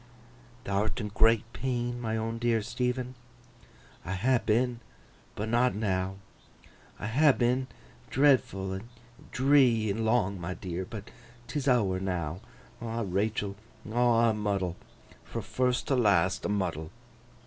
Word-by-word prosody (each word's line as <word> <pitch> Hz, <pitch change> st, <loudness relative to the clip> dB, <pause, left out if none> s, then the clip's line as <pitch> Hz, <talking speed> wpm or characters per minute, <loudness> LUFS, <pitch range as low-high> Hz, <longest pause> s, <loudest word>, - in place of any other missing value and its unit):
'Thou'rt 100 Hz, +2 st, -1 dB
in 105 Hz, -, -3 dB
great 115 Hz, +1 st, +4 dB
pain, 120 Hz, -1 st, -2 dB
my 110 Hz, -1 st, -1 dB
own 115 Hz, +1 st, -3 dB
dear 115 Hz, -2 st, +1 dB
Stephen?' 125 Hz, +2 st, -2 dB, 0.9 s
'I 95 Hz, -, -4 dB
ha' 120 Hz, +6 st, +2 dB
been, 120 Hz, +2 st, +1 dB, 0.6 s
but 105 Hz, -, -3 dB
not 120 Hz, +1 st, +2 dB
now. 95 Hz, -3 st, -1 dB, 0.8 s
I -, -, -6 dB
ha' 135 Hz, +6 st, +4 dB
been—dreadful, 125 Hz, -4 st, +1 dB
and 100 Hz, +5 st, -7 dB, 0.4 s
dree, 130 Hz, -5 st, +4 dB
and 110 Hz, +3 st, -2 dB
long, 110 Hz, -5 st, +1 dB
my 90 Hz, +2 st, -4 dB
dear—but 95 Hz, +3 st, -6 dB, 0.3 s
'tis 145 Hz, 0 st, -3 dB
ower 105 Hz, -8 st, +3 dB
now. 90 Hz, -2 st, -3 dB, 0.4 s
Ah, 115 Hz, 0 st, -2 dB
Rachael, 100 Hz, +1 st, -1 dB, 0.4 s
aw 120 Hz, -1 st, +4 dB
a -, -, -1 dB
muddle! 100 Hz, -4 st, -1 dB, 0.5 s
Fro' -, -, -5 dB
first 125 Hz, -1 st, 0 dB
to 135 Hz, -, +3 dB
last, 95 Hz, -5 st, +3 dB
a -, -, 0 dB
muddle! 85 Hz, -6 st, -1 dB
110 Hz, 125 wpm, -29 LUFS, 95-125 Hz, 0.9 s, great